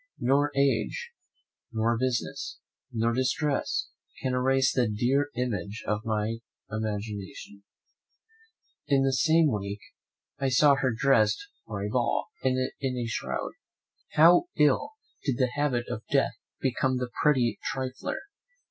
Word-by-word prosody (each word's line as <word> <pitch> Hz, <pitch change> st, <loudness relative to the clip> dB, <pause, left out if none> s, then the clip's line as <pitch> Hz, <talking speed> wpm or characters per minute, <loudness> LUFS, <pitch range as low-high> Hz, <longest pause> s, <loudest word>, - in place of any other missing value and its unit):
Nor 140 Hz, +3 st, +3 dB
age, 140 Hz, -, +1 dB, 0.6 s
nor 115 Hz, 0 st, +1 dB
business, 125 Hz, 0 st, -2 dB, 0.3 s
nor 115 Hz, +1 st, +1 dB
distress 130 Hz, +4 st, 0 dB, 0.3 s
can 130 Hz, -, 0 dB
erase 135 Hz, +1 st, +3 dB
the 125 Hz, -2 st, +2 dB
dear 130 Hz, +7 st, +1 dB
image 115 Hz, -4 st, -3 dB
from 105 Hz, 0 st, 0 dB
my 110 Hz, +1 st, -1 dB, 0.3 s
imagination. 105 Hz, -2 st, -5 dB, 1.3 s
In 135 Hz, -1 st, +3 dB
the 135 Hz, 0 st, +2 dB
same 160 Hz, +2 st, +4 dB
week, 100 Hz, -1 st, -3 dB, 0.6 s
I 135 Hz, -1 st, +1 dB
saw 140 Hz, +3 st, +6 dB
her 135 Hz, -2 st, +1 dB
dressed 125 Hz, -, +3 dB, 0.2 s
for 100 Hz, -2 st, -4 dB
a -, -, -2 dB
ball, 120 Hz, +2 st, 0 dB
and 130 Hz, 0 st, +1 dB
in 130 Hz, -2 st, -2 dB
a 120 Hz, -, -1 dB
shroud. 115 Hz, -, -3 dB, 0.6 s
How 170 Hz, -, +7 dB
ill 220 Hz, -, +3 dB, 0.3 s
did 135 Hz, -5 st, 0 dB
the 130 Hz, -2 st, +1 dB
habit 145 Hz, -5 st, 0 dB
of 110 Hz, -, -4 dB
death -, -, +2 dB, 0.3 s
become 130 Hz, 0 st, +1 dB
the 125 Hz, -1 st, -3 dB
pretty 130 Hz, -6 st, +3 dB
trifler! 130 Hz, -1 st, -3 dB
130 Hz, 130 wpm, -28 LUFS, 115-135 Hz, 1.3 s, How